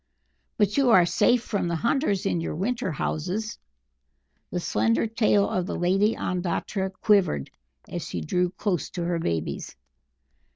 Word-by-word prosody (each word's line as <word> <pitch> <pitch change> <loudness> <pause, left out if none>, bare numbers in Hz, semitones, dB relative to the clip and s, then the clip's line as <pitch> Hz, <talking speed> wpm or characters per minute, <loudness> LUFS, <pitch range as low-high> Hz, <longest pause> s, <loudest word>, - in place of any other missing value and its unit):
"But 210 +1 +2
you 275 -3 +4
are 185 -6 +7
safe 240 +7 +3
from 200 -4 -1
the 170 - -1
hunters 235 - 0
in 175 -4 0
your 165 - -3
winter 230 +3 -1
houses?" 185 +9 -3 0.9
The 180 - -2
slender 110 - +1
tail 215 -2 +2
of 185 -1 -1
the - - -3
Lady 195 +5 +2
Ondatra 185 +2 -2
quivered 195 - +2 0.4
as - - -5
she 85 - -4
drew 180 - 0
closer 185 -4 -2
to 175 -2 -3
her 170 -1 0
babies. 80 - -3
185 Hz, 150 wpm, -26 LUFS, 170-215 Hz, 0.9 s, are